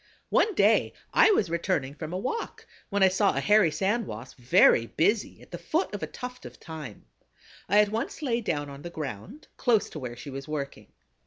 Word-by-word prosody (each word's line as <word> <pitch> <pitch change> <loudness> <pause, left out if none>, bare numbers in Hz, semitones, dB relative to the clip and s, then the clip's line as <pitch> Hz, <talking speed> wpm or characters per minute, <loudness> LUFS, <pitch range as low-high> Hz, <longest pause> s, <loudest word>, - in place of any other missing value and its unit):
One 425 -3 +3
day - - +3 0.2
I - - +6
was 215 - +2
returning 170 -5 -1
from 155 +2 -7
a 180 - -2
walk 260 - -4 0.2
when 200 -2 +2
I - - +8
saw 190 +2 +2
a - - +1
Hairy 210 -4 +4
Sand 205 +7 -1
Wasp 115 +5 -9
very 120 -1 +5
busy 205 - 0
at - - -19
the - - -6
foot 330 +4 -1
of - - -4
a - - -3
tuft 250 0 -8
of - - -10
thyme. 155 -10 -9 0.6
I 205 +3 +5
at 210 - +1
once 225 +8 -4
lay 240 -4 0
down 145 -9 -2
on 140 0 -10
the 175 - -7
ground, 155 - -7
close 230 -6 +2
to 155 - -6
where 125 -3 -6
she 140 +4 -9
was 135 +1 -7
working. 145 -2 -5
180 Hz, 210 wpm, -27 LUFS, 140-220 Hz, 0.6 s, I